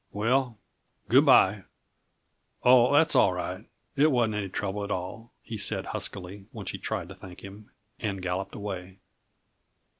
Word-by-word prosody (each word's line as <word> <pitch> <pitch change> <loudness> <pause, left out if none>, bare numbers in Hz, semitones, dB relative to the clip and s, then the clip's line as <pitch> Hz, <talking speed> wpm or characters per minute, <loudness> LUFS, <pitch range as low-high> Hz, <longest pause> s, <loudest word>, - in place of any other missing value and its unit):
"Well, 120 +3 0 0.5
good 135 +5 +5
by. 105 -6 +5 1.0
Oh, 125 0 +6
that's 155 +2 +4
all 95 - +5
right 90 +4 -5 0.3
it 145 +2 +4
wasn't 120 -4 +1
any 105 -2 -3
trouble 100 +2 -3
at 100 - -5
all," 105 +5 -5
he 110 -2 -7
said 100 - +1
huskily 95 +1 -4
when - - -8
she - - -5
tried 85 - -3
to 95 - -10
thank 90 -1 -12
him, 100 +2 -11 0.3
and 100 -4 -3
galloped 90 +1 -4
away. 95 -2 -6
105 Hz, 150 wpm, -27 LUFS, 95-120 Hz, 1.0 s, Oh